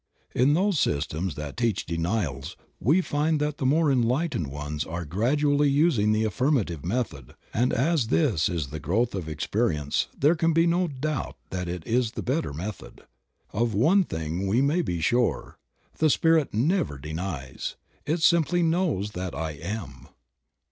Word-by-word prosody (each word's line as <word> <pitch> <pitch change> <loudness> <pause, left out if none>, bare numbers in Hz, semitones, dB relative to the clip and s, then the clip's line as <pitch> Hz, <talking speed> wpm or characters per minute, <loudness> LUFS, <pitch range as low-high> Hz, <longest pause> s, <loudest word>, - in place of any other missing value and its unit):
In 135 +4 +3
those 190 -2 +2
systems 75 +3 -1
that 75 -1 -6
teach 115 -4 0
denials 85 -4 -2 0.2
we 160 +10 +3
find 155 -1 0
that 150 0 -1
the 130 - +1
more 155 +2 +3
enlightened 125 - +1
ones 75 +2 -4
are 85 +1 -5
gradually 145 - +2
using 140 -8 +3
the 110 +1 +2
affirmative 110 - 0
method, 85 - -3 0.2
and 125 +3 +2
as 140 -1 +1
this 115 - +2
is 80 -6 -2
the 75 +2 -6
growth 100 - 0
of 95 -4 -3
experi 80 +4 -1
ence 70 -1 -1
there 150 +4 +4
can 165 -1 +1
be 165 +1 +4
no 175 +1 +2
doubt 150 0 -3
that 90 -1 -3
it 85 -2 -5
is 115 -1 +1
the - - -5
better 135 - -1
method. 90 +8 -7 0.5
Of 115 0 0
one 170 - +4
thing 80 - -3
we 105 +6 +2
may 145 +6 +2
be 85 - -2
sure, 120 +8 0 0.4
the 155 - +4
Spirit 160 0 +3
never 140 - +1
denies. 75 -2 -5 0.3
It 160 +3 -1
simply 170 +1 +4
knows 160 - 0
that 90 -5 -5
I 80 +1 -3
am. 75 - -7
115 Hz, 160 wpm, -26 LUFS, -, 0.5 s, there